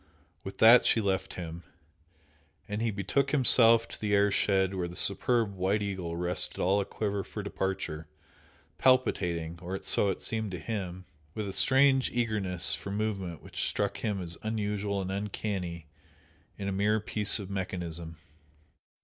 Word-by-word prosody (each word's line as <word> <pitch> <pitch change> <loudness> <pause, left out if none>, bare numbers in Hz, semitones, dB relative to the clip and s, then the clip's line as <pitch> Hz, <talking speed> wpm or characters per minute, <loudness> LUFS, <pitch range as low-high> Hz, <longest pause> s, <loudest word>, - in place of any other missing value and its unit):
With 95 - -8
that 115 +2 +8
she - - +3
left 95 -2 -1
him. 85 -1 -7 1.1
And 105 +1 -3
he 115 - +1
betook 105 +7 0
himself 115 -5 +5
to - - -8
the 105 -1 +1
air 100 0 +3
shed 95 -1 +1
where 90 -2 -2
the 85 - -10
superb 105 +3 +3
"White 95 +3 0
Eagle" 90 -4 -4
rested 90 0 -1
all 100 +3 +2
a - - -3
quiver 100 -1 -3
for 105 - -7
departure, 95 -6 -4 0.7
palpitating, 85 -10 +1
or 95 +2 -4
so 100 - +3
it 95 - -4
seemed 110 -2 -2
to 90 - -4
him, 95 -3 -5 0.3
with 105 -2 -3
a 95 - -5
strange 135 +2 +4
eagerness 105 -7 -1
for - - -5
movement 100 -5 -3
which - - -5
struck 100 0 -2
him 105 -1 -2
as 85 -2 -6
unusual 105 -2 -2
and 95 - -4
"uncanny" 95 -4 -4 0.7
in 100 - -5
a - - -1
mere 105 +3 +1
piece 105 0 +1
of 100 -3 -7
mechanism. 85 -4 -5
100 Hz, 160 wpm, -29 LUFS, 90-110 Hz, 1.1 s, that